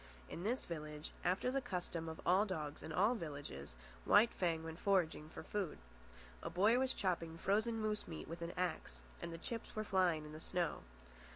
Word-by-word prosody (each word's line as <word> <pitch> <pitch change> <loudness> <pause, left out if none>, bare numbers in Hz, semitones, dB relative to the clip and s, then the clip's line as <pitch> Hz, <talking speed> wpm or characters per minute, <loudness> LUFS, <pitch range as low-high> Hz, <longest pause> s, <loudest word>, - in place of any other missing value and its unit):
In - - -4
this 235 +7 0
village, 150 -2 -5
after 185 +8 +2
the 275 +1 +1
custom 175 -5 -3
of 160 - -6
all 185 +3 +6
dogs 155 -8 -3
in - - -6
all 200 +9 +4
villages, 145 - -5 0.3
White 230 - +6
Fang 165 -3 +1
went 165 +1 -6
foraging, 175 -6 +2
for - - -8
food. 200 -6 -2 0.6
A - - -3
boy 210 +7 +5
was 260 0 +2
chopping 165 -3 0
frozen 215 +6 +2
moose 215 -1 -1
meat 160 -2 -6
with 170 +2 -6
an 170 +1 -3
axe, 160 - -2 0.2
and 170 - -4
the 165 - -5
chips 230 +6 -5
were 215 - 0
flying 180 -6 +3
in 150 - -8
the 155 - -7
snow. 175 0 -1
175 Hz, 190 wpm, -39 LUFS, 160-205 Hz, 0.6 s, all